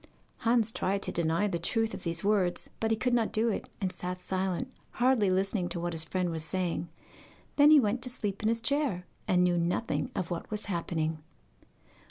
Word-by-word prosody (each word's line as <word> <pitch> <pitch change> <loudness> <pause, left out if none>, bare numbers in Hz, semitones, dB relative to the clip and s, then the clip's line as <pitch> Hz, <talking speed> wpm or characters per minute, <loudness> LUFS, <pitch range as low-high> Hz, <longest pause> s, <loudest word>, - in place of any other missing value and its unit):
Hans 230 -1 +2
tried 200 -2 -1
to - - -2
deny 165 +3 +1
the 175 -4 -2
truth 225 +6 0
of - - -6
these 170 0 -3
words, 195 -4 +1
but 220 - 0
he 225 - +2
could 250 +3 0
not 230 -2 +2
do 225 +2 +3
it, 215 - -3
and 190 -2 -1
sat 180 0 -5
silent, 190 +7 -2 0.2
hardly 240 -5 +3
listening 190 0 0
to 175 - -3
what 175 0 -2
his 160 -1 0
friend 180 0 -1
was 160 -1 -3
saying. 175 0 -2 0.7
Then 290 +1 +7
he 305 -1 +9
went 240 0 +1
to 250 - -1
sleep 205 -5 -3
in 215 - +2
his 230 0 +1
chair, 260 -8 0 0.2
and 180 -1 +4
knew 175 -1 +3
nothing 175 +7 -1
of 180 -1 -2
what 170 - -4
was 210 -1 -3
happening. 165 -4 -2
190 Hz, 205 wpm, -30 LUFS, 175-225 Hz, 0.7 s, he